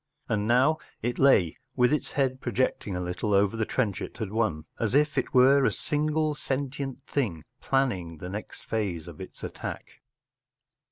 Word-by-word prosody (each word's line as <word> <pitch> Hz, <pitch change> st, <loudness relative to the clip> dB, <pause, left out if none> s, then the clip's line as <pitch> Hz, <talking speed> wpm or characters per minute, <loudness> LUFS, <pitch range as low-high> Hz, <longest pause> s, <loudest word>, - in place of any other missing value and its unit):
And 105 Hz, 0 st, 0 dB
now 130 Hz, +7 st, +4 dB, 0.2 s
it 120 Hz, +1 st, -1 dB
lay 100 Hz, -, +5 dB, 0.2 s
with 125 Hz, +2 st, +4 dB
its 150 Hz, -, -1 dB
head 130 Hz, -2 st, 0 dB
projecting 120 Hz, -5 st, -1 dB
a -, -, -2 dB
little 90 Hz, +3 st, -1 dB
over 100 Hz, +2 st, +3 dB
the 110 Hz, -1 st, -1 dB
trench 110 Hz, -7 st, 0 dB
it -, -, -6 dB
had 110 Hz, -4 st, -4 dB
won, 105 Hz, -9 st, 0 dB
as 115 Hz, +2 st, 0 dB
if 150 Hz, +1 st, +3 dB
it -, -, 0 dB
were 135 Hz, +2 st, +6 dB
a -, -, +4 dB
single 155 Hz, +1 st, 0 dB
sentient 135 Hz, -1 st, -3 dB
thing 100 Hz, -, -1 dB, 0.2 s
planning 95 Hz, -12 st, 0 dB
the 90 Hz, -, -7 dB
next 105 Hz, +3 st, -7 dB
phase 95 Hz, -7 st, -2 dB
of 85 Hz, +1 st, -10 dB
its 95 Hz, -, -10 dB
attack. -, -, -7 dB
120 Hz, 170 wpm, -27 LUFS, 100-135 Hz, 0.2 s, were